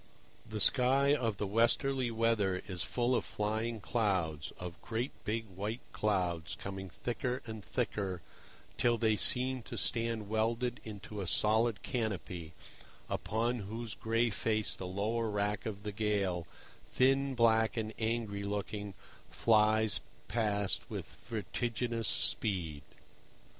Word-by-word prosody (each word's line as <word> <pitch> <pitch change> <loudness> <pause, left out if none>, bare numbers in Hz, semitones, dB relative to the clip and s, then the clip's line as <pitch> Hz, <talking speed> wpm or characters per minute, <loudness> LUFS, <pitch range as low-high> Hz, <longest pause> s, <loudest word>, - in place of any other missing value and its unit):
The 110 -1 -3
sky 135 +5 +6
of 115 -7 0
the 105 - -1
westerly 120 +5 +2
weather 110 -5 +1
is 95 -3 -5
full 120 +7 +1
of 120 - +2
flying 110 +2 -2
clouds, 95 -10 0
of 90 -1 -7
great 120 +4 -2
big 115 +1 -1
white 105 +4 -4
clouds 90 -6 0
coming 95 -1 -6
thicker 125 +6 -3
and 110 -3 -7
thicker 90 +2 -2 0.5
till 120 -1 +3
they 110 -1 +3
seem 130 +4 +4
to - - -7
stand 115 -2 +1
welded 115 +3 0
into 105 -1 -7
a 95 - -4
solid 110 +2 +2
canopy, 95 - -3 0.5
upon 120 +3 0
whose 110 +2 -5
gray 115 +2 +1
face 110 +1 0
the 95 - -6
lower 110 +5 -1
wrack 105 0 -1
of 100 -2 -5
the 105 - -3
gale, 100 -5 0 0.4
thin, 135 +1 +3
black 115 -1 +4
and 110 -1 -2
angry 110 -3 -1
looking, 100 0 -3 0.3
flies 110 -1 +4 0.3
past 105 -3 0
with - - -6
vertiginous 115 +1 -2
speed. 85 -6 +1
110 Hz, 125 wpm, -33 LUFS, 100-115 Hz, 0.5 s, sky